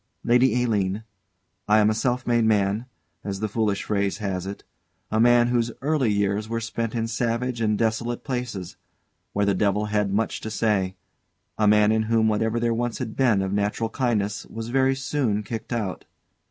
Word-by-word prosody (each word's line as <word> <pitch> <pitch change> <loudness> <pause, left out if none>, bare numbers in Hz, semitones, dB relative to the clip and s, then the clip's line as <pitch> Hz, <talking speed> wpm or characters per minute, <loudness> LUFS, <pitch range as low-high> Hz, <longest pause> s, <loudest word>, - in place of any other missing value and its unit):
_] - - -49 0.2
Lady 125 +1 +3
Aline, 105 -3 0 0.6
I 105 0 +5
am 105 0 +4
a - - +1
self 125 +2 -1
made 120 -1 +2
man, 105 +2 +1 0.4
as 100 -1 -4
the 110 - -1
foolish 105 -1 -1
phrase 100 -2 0
has 95 -3 -3
it 100 - -7 0.5
a 110 - +1
man 120 +1 +5
whose 120 -1 +1
early 140 -5 +1
years 100 +1 0
were 115 0 -1
spent 115 0 -3
in 115 -1 0
savage 115 +1 -1
and 105 -1 +1
desolate 115 +2 -1
places, 120 -9 -4 0.6
where 100 0 +1
the 100 - +2
devil 100 +2 +1
had 105 -2 +1
much 110 +3 -1
to 110 - -5
say; 105 -4 0 0.6
a 105 - +4
man 105 0 +5
in 110 0 +2
whom 115 -1 +3
whatever 110 +2 +1
there 115 0 +1
once 120 0 -2
had 115 -4 -5
been 115 -7 +3
of 95 0 -2
natural 105 +2 -1
kindness 110 -6 -1
was 115 +1 -6
very 135 +1 +2
soon 135 -6 -1
kicked 110 +1 -6
out. 110 -6 -3
110 Hz, 185 wpm, -24 LUFS, 105-120 Hz, 0.6 s, I